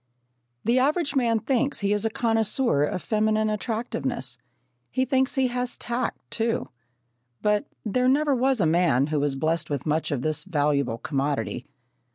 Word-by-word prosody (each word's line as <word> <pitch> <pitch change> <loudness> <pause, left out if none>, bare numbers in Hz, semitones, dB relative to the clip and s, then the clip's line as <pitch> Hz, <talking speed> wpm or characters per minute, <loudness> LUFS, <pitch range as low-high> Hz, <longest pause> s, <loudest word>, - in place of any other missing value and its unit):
The 240 +3 +3
average 285 +2 +1
man 235 -4 +3
thinks 270 0 0
he 200 +1 +2
is 210 +1 +1
a - - +2
connoisseur 225 - +1
of 175 - -4
feminine 215 0 +1
attractiveness. 225 +2 -3 0.5
He 260 0 0
thinks 265 +1 +1
he 265 -1 +3
has 250 0 -2
tact, 240 0 -2
too, 230 +1 -1 0.7
but 210 0 +2 0.2
there 250 +4 +1
never 285 +2 +3
was 260 0 +2
a 185 - +3
man 160 -5 +3
who 150 0 -1
was 140 -1 0
blessed 160 +4 -1
with 140 -3 -3
much 155 +1 0
of 135 -4 -2
this 155 -1 -1
valuable 145 -8 0
commodity. 140 -1 -2
215 Hz, 160 wpm, -25 LUFS, 155-250 Hz, 0.7 s, The